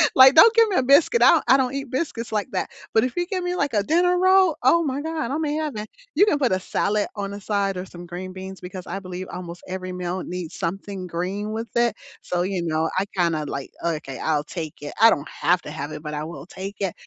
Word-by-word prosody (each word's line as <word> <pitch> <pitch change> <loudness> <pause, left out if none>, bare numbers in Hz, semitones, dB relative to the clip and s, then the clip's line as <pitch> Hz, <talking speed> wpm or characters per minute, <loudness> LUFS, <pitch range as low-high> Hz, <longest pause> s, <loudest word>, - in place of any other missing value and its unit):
Like, 260 +2 +9
don't 445 +8 +9
give 455 -1 +6
me 390 - -1
a 260 - +3
biscuit, 285 - +5
I - - +8
don't - - +3
I 265 - +7
don't 260 0 0
eat 275 -2 -4
biscuits 255 -5 -3
like 210 -2 -1
that, - - -2 0.2
but 220 - +4
if 255 - -2
you 350 - +1
give 370 -1 -3
me, 355 0 -1
like, 280 -7 -1
a 205 - +3
dinner 355 - +3
roll? 375 -3 +4
Oh 335 +6 +5
my 280 -1 -2
God, 315 -5 -3
I 295 - 0
may 300 -2 -1
have 310 -2 -2
that. 215 0 -5 0.3
You 405 - +6
can 300 - +3
put 260 -6 +1
a 185 - +2
salad 205 +2 0
on 200 -1 -4
the 200 0 -7
side 200 -2 -1
or 180 - -4
some 175 -1 -11
green 180 +2 -7
beans 190 0 -8
because 180 0 -8
I 195 - -4
believe 185 -1 -7
almost 175 -1 -7
every 185 0 -5
meal 180 0 -3
needs 175 -2 -6
something 190 +1 -4
green 190 +5 -3
with 225 +1 -4
it. 235 -2 +2 0.3
So, 175 0 -1
you 190 -1 -2
know, 160 -1 0
I 195 - 0
kinda, 165 -4 +1
like, 140 -1 -5
"Okay, 155 -5 -3
I'll 150 -2 0
take 160 -2 -6
it." 145 - -6
I 225 - +9
don't 145 -5 0
have 180 +4 +1
to 150 - -7
have 145 0 -5
it, 150 0 -7
but 150 -1 -5
I 150 0 -3
will 155 -3 -8
take 195 +2 -7
it. 195 -3 -1
195 Hz, 260 wpm, -23 LUFS, 175-265 Hz, 0.3 s, Like